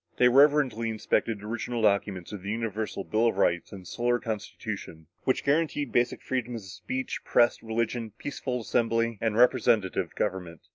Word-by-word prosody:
They 125 - +6
reverently 135 -4 +4
inspected 110 -1 -1
original 115 +1 -3
documents 100 -3 +1
of 105 -3 -6
the 100 - -6
Universal 110 -2 -3
Bill 110 +4 +1
of 110 - 0
Rights 85 -3 +1
and 95 -3 -9
the - - -20
Solar 120 +5 0
Constitution, 105 -7 -6 0.2
which 130 - +1
guaranteed 145 -2 +1
basic 120 0 +1
freedoms 120 -3 -3
of - - -11
speech, 130 +8 -4
press, 120 0 +3
religion, 115 0 -2
peaceful 130 -3 -4
assembly 115 -1 0
and 110 -1 0
representative 120 -5 +3
government. 90 -4 -3
115 Hz, 155 wpm, -28 LUFS, 105-125 Hz, 0.2 s, They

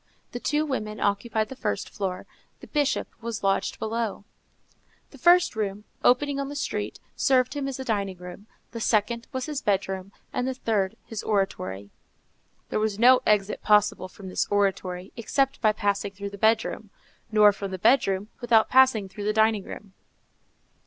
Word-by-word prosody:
The 245 - -5
two 300 +4 0
women 215 -7 -3
occupied 215 +2 0
the 265 - -7
first 100 - -2
floor; 190 -3 -4 0.3
the - - -11
Bishop 290 -2 0
was 230 -2 -5
lodged 195 0 0
below. 220 -2 -3 0.9
The 275 - -15
first 350 -1 +5
room, 205 -1 -3 0.2
opening 280 +3 +3
on 275 0 -3
the 290 - -7
street, 285 - -3 0.2
served 255 0 +2
him 285 -2 -3
as 270 - -4
dining 205 -7 -2
room, 180 +4 -10 0.2
the 230 - -6
second 230 +2 +1
was 260 -2 -3
his 300 -3 -4
bedroom, 195 -1 -1 0.2
and 250 - -1
the 260 - -2
third 210 -6 -1
his 225 -2 -5
oratory. 100 - -2 0.8
There - - -1
was 215 -2 -1
no 250 +3 +6
exit 210 -1 +2
possible 210 -3 +3
from 190 +1 -12
this 185 - -1
oratory, 190 -2 -1
except 270 +4 0
by 215 - +5
passing 200 -1 -1
through 200 0 -6
the 200 - -9
bedroom, 220 -1 +1 0.4
nor 210 -1 +6
from 200 0 -5
the 190 - -4
bedroom, 195 -2 +2
without 235 -2 +3
passing 255 -6 +5
through 200 +2 -7
the 210 - +1
dining 220 -2 +2
room. 200 -2 -10
215 Hz, 165 wpm, -26 LUFS, 200-250 Hz, 0.9 s, no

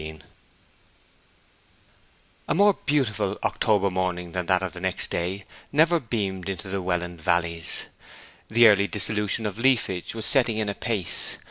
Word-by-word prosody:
XVIII 80 0 -8 2.3
A - - 0
more 200 +3 +5
beautiful 135 -7 0
October 100 -2 +1
morning 90 -1 -2
than 90 0 -3
that 95 0 +2
of 95 - -4
the 90 - -8
next 95 0 -1
day 95 +3 -3 0.3
never 165 +4 +3
beamed 100 - -3
into 95 0 -5
the 95 0 -2
Welland 90 -2 -3
valleys. 85 0 -1 0.6
The 115 +2 0
yearly 100 -3 +6
dissolution 105 +1 0
of 105 +1 -4
leafage 115 -8 +1
was 110 -1 -3
setting 120 -5 +3
in 110 -2 -1
apace. 100 -3 0
100 Hz, 140 wpm, -25 LUFS, 90-115 Hz, 2.3 s, yearly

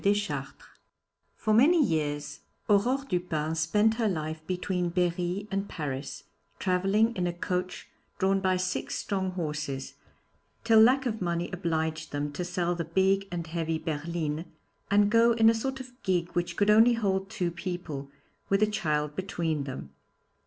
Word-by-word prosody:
DESCHARTRES_ 205 0 0 0.8
For 215 - 0
many 285 +11 +6
years 150 - 0 0.3
Aurore 245 +7 +2
Dupin 160 - -1
spent 205 +8 +2
her 230 -2 +1
life 155 -4 -3
between 180 -1 -1
Berry 180 +3 -1
and 195 +1 -2
Paris, 145 -2 -5 0.3
travelling 195 +5 +2
in 180 -1 0
a - - 0
coach 180 +1 -3 0.3
drawn 195 0 +2
by 185 -1 +1
six 185 0 -2
strong 190 -2 -1
horses, 150 -5 -4 0.7
till 225 -1 +6
lack 255 +5 +5
of 225 -4 -2
money 170 0 -1
obliged 160 -3 -2
them 145 0 -2
to 150 +5 -4
sell 175 0 -1
the 170 -1 -3
big 190 +4 +2
and 170 -2 -3
heavy 165 0 -2
'Berlin,' 160 0 -3 0.4
and 205 +1 +4
go 230 +1 +5
in 225 -1 +5
a - - +1
sort 265 +4 -3
of 255 -1 -9
gig 175 -2 0
which 175 0 -2
could 205 0 +4
only 225 +3 +6
hold 195 -4 0
two 175 -3 -2
people, 170 -5 -5 0.4
with 195 +2 +3
a - - +7
child 150 -8 -1
between 165 -6 -2
them. 130 - -7
180 Hz, 155 wpm, -28 LUFS, 160-205 Hz, 0.8 s, a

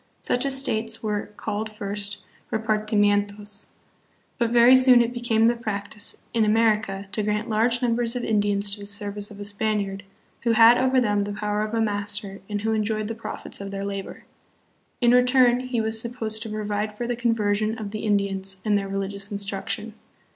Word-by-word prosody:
Such 250 +3 0
estates 230 -5 +1
were 210 -1 -2
called 215 +1 -3
first 205 -1 -4 0.3
"repartimientos." 210 -1 0 0.7
But 235 -2 +2
very 240 +2 +7
soon 255 -1 +7
it 235 0 +1
became 235 -2 +1
the 235 +1 +4
practice, 205 -2 -3
hi 230 - +1
America, 215 -2 +1
to 200 - 0
grant 210 +2 -2
large 235 +3 +1
numbers 235 0 0
of 245 - -3
Indians 205 -2 +1
to 205 - -1
the 200 - -8
ser 205 0 -1
vice 205 0 -3
of 205 - -12
a - - -5
Spaniard, 205 -1 -1 0.4
who 235 -1 +1
had 230 +2 +7
over 260 0 +3
them 205 -4 +1
the 205 0 -4
power 210 0 -2
of 215 +1 -3
a 225 - +1
master 205 -1 -2
and 205 -1 -3
\vho 220 +1 0
enjoyed 215 0 -1
the - - -2
profits 225 -2 -7
of 200 - -6
their 195 0 -5
labor. 195 -1 -6 0.8
In 240 -1 +5
return 250 0 +4
he 255 -2 -3
was 220 0 +1
supposed 225 -2 -2
to 225 - -5
provide 210 0 -3
for 240 - -3
the 240 0 -2
conversion 220 -2 0
of 210 -3 -6
the 215 - -5
Indians 195 -2 0
and 210 -1 +2
their 200 -1 -1
religious 195 +1 -3
instruction. 200 +2 -3
215 Hz, 185 wpm, -24 LUFS, 205-230 Hz, 0.8 s, very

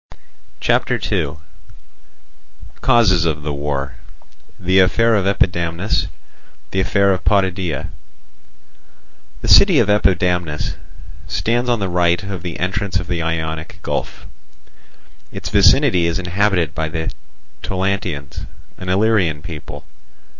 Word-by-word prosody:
r. - - -17 0.4
CHAPTER - - +1
II 70 - 0 1.5
Causes 110 -9 +4
of 75 -3 -1
the 75 -1 -3
War—The 75 +5 -3
Affair 115 +5 +3
of 100 -3 +1
Epidamnus—The 90 0 -2
Affair 100 +1 +2
of 90 -3 -4
Potidæa 95 -7 0 1.5
The - - -4
city - - +7
of - - +3
Epidamnus 90 -6 +1 0.5
stands 120 +2 0
on 120 - +2
the 100 - -1
right 90 0 +1
of 100 -3 -5
the 85 -2 -5
entrance 95 +1 -1
of 90 - -5
the 85 -1 -2
Ionic 80 +1 -3
Gulf. - - -4 1.1
Its - - -6
vicinity 100 - +4
is 85 - -1
inhabited 90 -3 0
by 80 0 -2
the 80 0 -3 0.5
Taulantians, 95 -7 -3 0.3
an 90 - -6
Illyrian 95 -6 +2
people. 80 -4 -8
90 Hz, 110 wpm, -19 LUFS, 80-100 Hz, 1.5 s, city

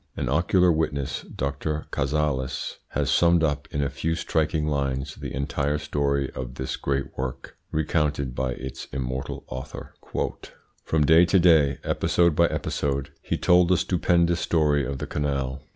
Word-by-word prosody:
An - - -1
ocular 90 +4 +3
witness, 75 -4 -1
Dr. 75 +3 -3
Cazalis, 70 -2 -1
has - - -1
summed 85 -1 +4
up 75 -2 0
in 70 - -1
a 70 - 0
few 80 +5 -1
striking 80 -1 0
lines 70 -2 -1
the - - -7
entire 70 +1 -1
story 70 -2 -1
of 65 0 -6
this 65 -1 -3
great 70 0 -2
work, 65 -1 -5 0.2
recounted 75 -4 0
by 65 0 -1
its 65 +1 -7
immortal 65 0 -4
author. 65 +2 -8 0.9
"From 80 -2 +1
day 80 +3 +7
to 95 - +3
day, 80 -6 +5
episode 85 -3 +2
by 85 +2 +5
episode, 70 -4 -2
he - - -2
told 90 0 +4
the 90 - +4
stupendous 85 -1 +2
story 75 -4 +2
of 70 - -3
the - - -4
canal. 70 -2 -2
75 Hz, 150 wpm, -25 LUFS, 70-80 Hz, 0.9 s, day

